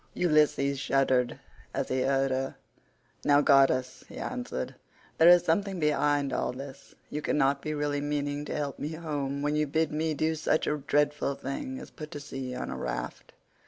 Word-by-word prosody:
Ulysses 150 Hz, -4 st, +2 dB
shuddered 130 Hz, -3 st, +1 dB, 0.4 s
as -, -, -1 dB
he 130 Hz, 0 st, 0 dB
heard 135 Hz, 0 st, +2 dB
her. 135 Hz, +1 st, -2 dB, 0.7 s
"Now 145 Hz, 0 st, +5 dB
goddess," 135 Hz, -3 st, +3 dB
he -, -, -10 dB
answered, 250 Hz, -1 st, -4 dB, 0.5 s
"there 165 Hz, +2 st, +8 dB
is 175 Hz, -1 st, +7 dB
something 190 Hz, +3 st, 0 dB
behind 145 Hz, -2 st, +2 dB
all -, -, -1 dB
this; 135 Hz, +1 st, -10 dB, 0.2 s
you 150 Hz, -, -3 dB
cannot 140 Hz, -1 st, +1 dB
be 155 Hz, +1 st, -3 dB
really 145 Hz, -1 st, -1 dB
meaning 145 Hz, 0 st, -2 dB
to -, -, -4 dB
help 145 Hz, -3 st, -3 dB
me 150 Hz, +2 st, -3 dB
home 145 Hz, -4 st, -3 dB
when 145 Hz, +1 st, +1 dB
you 150 Hz, 0 st, +1 dB
bid 160 Hz, +2 st, +1 dB
me 155 Hz, +1 st, -1 dB
do 155 Hz, +2 st, +1 dB
such 155 Hz, 0 st, +1 dB
a 150 Hz, -, 0 dB
dreadful 145 Hz, 0 st, +1 dB
thing 135 Hz, -1 st, -5 dB
as -, -, -10 dB
put 155 Hz, -1 st, -8 dB
to 145 Hz, -, -7 dB
sea 135 Hz, -2 st, -6 dB
on 65 Hz, -, -4 dB
a 65 Hz, -, -4 dB
raft. 60 Hz, -1 st, -5 dB
145 Hz, 180 wpm, -29 LUFS, 135-150 Hz, 0.7 s, there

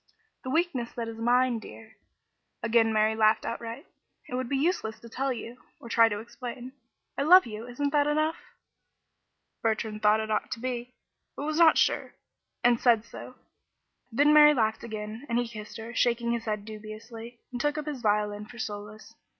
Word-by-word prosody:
"The 260 Hz, -, -5 dB
weakness 275 Hz, -6 st, 0 dB
that 235 Hz, -1 st, -4 dB
is 225 Hz, 0 st, -7 dB
mine, 245 Hz, +1 st, +2 dB
dear." 220 Hz, 0 st, -13 dB, 0.7 s
Again 230 Hz, -1 st, +3 dB
Mary 215 Hz, 0 st, +2 dB
laughed 215 Hz, 0 st, +3 dB
outright. 230 Hz, 0 st, -5 dB, 0.4 s
"It -, -, -9 dB
would 255 Hz, -1 st, -2 dB
be 275 Hz, -, 0 dB
useless 275 Hz, -8 st, -1 dB
to 235 Hz, -, -13 dB
tell 270 Hz, +3 st, -1 dB
you 245 Hz, 0 st, -7 dB, 0.2 s
or 235 Hz, -, -11 dB
to -, -, -4 dB
try 230 Hz, -1 st, +6 dB
to 205 Hz, -, -3 dB
explain. 245 Hz, +3 st, -8 dB, 0.5 s
I -, -, +2 dB
love 360 Hz, +6 st, +7 dB
you, 225 Hz, 0 st, -7 dB
isn't 280 Hz, +4 st, -2 dB
that 290 Hz, -1 st, +3 dB
enough?" 310 Hz, +2 st, +1 dB, 1.2 s
Bertrand 220 Hz, -1 st, -1 dB
thought 210 Hz, 0 st, +4 dB
it 220 Hz, 0 st, -3 dB
ought 215 Hz, -, 0 dB
to 235 Hz, -, -8 dB
be, 250 Hz, 0 st, -4 dB, 0.4 s
but 285 Hz, -, -5 dB
was 310 Hz, +1 st, -1 dB
not 330 Hz, -2 st, +7 dB
sure, -, -, +1 dB, 0.5 s
and 240 Hz, -1 st, +4 dB
said 230 Hz, -3 st, +3 dB
so. -, -, -10 dB, 0.8 s
Then 290 Hz, +6 st, +4 dB
Mary 300 Hz, 0 st, +8 dB
laughed 220 Hz, -2 st, 0 dB
again, 215 Hz, +1 st, -6 dB
and 235 Hz, -, +1 dB
he 245 Hz, 0 st, 0 dB
kissed 215 Hz, -2 st, -9 dB
her, 225 Hz, +1 st, -8 dB
shaking 235 Hz, -1 st, +1 dB
his 235 Hz, -1 st, -2 dB
head 210 Hz, -2 st, -3 dB
dubiously, 225 Hz, +2 st, -9 dB
and 245 Hz, -1 st, -4 dB
took 295 Hz, +2 st, 0 dB
up 305 Hz, -, -3 dB
his 290 Hz, -5 st, -5 dB
violin 210 Hz, -1 st, 0 dB
for 235 Hz, -, -13 dB
solace. 210 Hz, -2 st, -7 dB
235 Hz, 185 wpm, -28 LUFS, 220-255 Hz, 1.2 s, Mary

